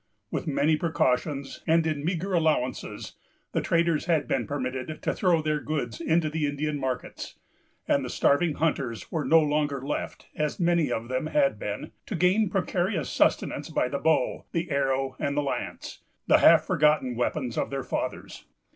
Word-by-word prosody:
With - - -3
many 150 +1 +2
precautions, 140 -3 -1
and 165 0 +4
in 155 -3 -1
meagre 180 +3 -2
allowances, 155 -7 -1 0.4
the - - 0
traders 170 -2 +1
had 160 -4 +1
been 120 -4 -1
permitted 130 +1 -4
to - - 0
throw 175 -5 +2
their 155 -1 0
goods 145 -4 -3
into 165 -1 +2
the 155 -1 -1
Indian 145 +1 -2
markets; 130 -2 -4 0.5
and 140 - +2
the 125 - -4
starving 150 +5 +2
hunters 135 -7 -2
were 160 -3 -1
no 165 +3 +5
longer 145 -2 0
left, 140 +3 -5
as 150 +3 -2
many 170 -5 +2
of 115 0 -2
them 130 +4 -2
had 280 - +2
been, - - -5 0.2
to 215 - -3
gain 185 +4 +3
precarious 180 - -1
sustenance - - +1
by - - +1
the 140 - -2
bow, 160 0 +1
the 170 +1 -2
arrow, 135 -1 0
and 140 0 -1
the 145 - +2
lance——the 140 - -2
half - - +7
forgotten 150 -4 +2
weapons 125 0 -1
of - - -1
their 135 -1 -3
fathers. - - -4
150 Hz, 165 wpm, -27 LUFS, 135-165 Hz, 0.5 s, half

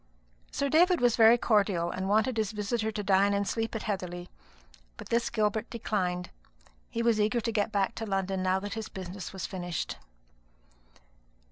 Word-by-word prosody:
Sir 280 - -1
David 345 +5 +4
was 245 -2 +3
very 230 +1 +7
cordial, 200 -7 +2
and 190 +1 -3
wanted 220 +4 +2
his 215 -2 0
visitor 215 +1 -1
to 210 -1 -4
dine 200 +1 +3
and 200 0 0
sleep 225 +3 -2
at 220 - -3
Heatherly; 180 -4 -4 0.7
but - - -10
this 235 0 +1
Gilbert 220 0 0
declined. 180 -6 -2 0.6
He 230 -1 -2
was 230 -2 +3
eager 215 +3 +2
to 230 0 -2
get 215 0 0
back 200 -2 +1
to 225 - -3
London 195 -1 -1
now 185 0 +2
that 205 0 -5
his 220 -1 -5
business 185 0 -7
was 190 -2 -5
finished. 175 -3 -4
210 Hz, 170 wpm, -29 LUFS, 190-225 Hz, 0.7 s, very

